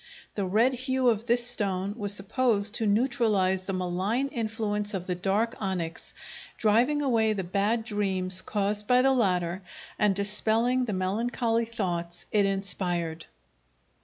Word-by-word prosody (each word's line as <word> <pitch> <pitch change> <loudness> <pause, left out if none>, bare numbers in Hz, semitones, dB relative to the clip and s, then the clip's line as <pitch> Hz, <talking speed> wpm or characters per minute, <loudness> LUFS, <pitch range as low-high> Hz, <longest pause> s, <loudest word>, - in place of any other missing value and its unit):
The 200 -2 -2
red 225 +7 +3
hue 255 0 +1
of 225 0 -1
this 240 0 +3
stone 200 -5 -1
was 205 -3 -2
supposed 210 +1 +1
to 225 - 0
neutralize 210 -5 +1
the 195 - -3
malign 190 +9 -1
influence 215 -3 -3
of 185 -2 -4
the 180 - -2
dark 200 +6 0
onyx, 180 -5 -4 0.4
driving 240 +8 +2
away 225 -5 +2
the 195 -2 -3
bad 200 +6 0
dreams 190 -4 0
caused 205 0 -1
by 250 0 +4
the 270 0 +4
latter 180 -6 0 0.4
and 205 -2 +3
dispelling 220 +5 +2
the 215 - -3
melancholy 230 +5 0
thoughts 175 -6 -3
it 205 -2 +3
inspired. 180 -4 -1
210 Hz, 140 wpm, -27 LUFS, 190-230 Hz, 0.4 s, by